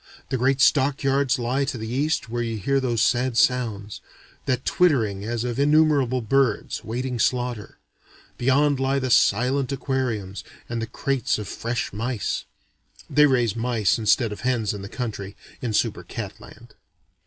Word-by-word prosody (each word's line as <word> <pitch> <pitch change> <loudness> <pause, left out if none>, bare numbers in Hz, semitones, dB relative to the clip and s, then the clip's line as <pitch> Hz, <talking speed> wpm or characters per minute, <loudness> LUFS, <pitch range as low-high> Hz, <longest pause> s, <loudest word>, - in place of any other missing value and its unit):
The 130 - 0
great 135 +2 +1
stock 140 -1 +3
yards 135 -1 +2
lie 125 +3 0
to 135 - -3
the 110 0 -5
east 150 +2 0
where 120 +1 -3
you 115 -1 -2
hear 135 +7 +1
those 120 -4 0
sad 125 -1 +1
sounds: 110 -5 0 0.5
that 130 -1 0
twittering 115 - +2
as 115 +1 -2
of 125 +1 -3
innumerable 145 -4 +3
birds, 130 -1 0
waiting 125 +2 -3
slaughter. 120 -3 -1 0.6
Beyond 140 +2 +2
lie 135 +1 +1
the 130 -2 -1
silent 125 +5 +3
aquariums 125 -8 -2 0.2
and 120 -1 -3
the 115 - -3
crates 135 -1 -1
of 105 -2 -6
fresh 115 -2 -3
mice. 115 +1 -2 0.7
(They 150 0 +6
raise 120 -5 +1
mice 115 -3 +1
instead 110 +1 +2
of 105 - -7
hens 120 -5 0
in 100 - -6
the 100 - -8
country, 105 -6 -5 0.3
in 120 - -2
Super 105 - 0
cat - - -7
Land.) - - -15
125 Hz, 160 wpm, -24 LUFS, 115-135 Hz, 0.7 s, They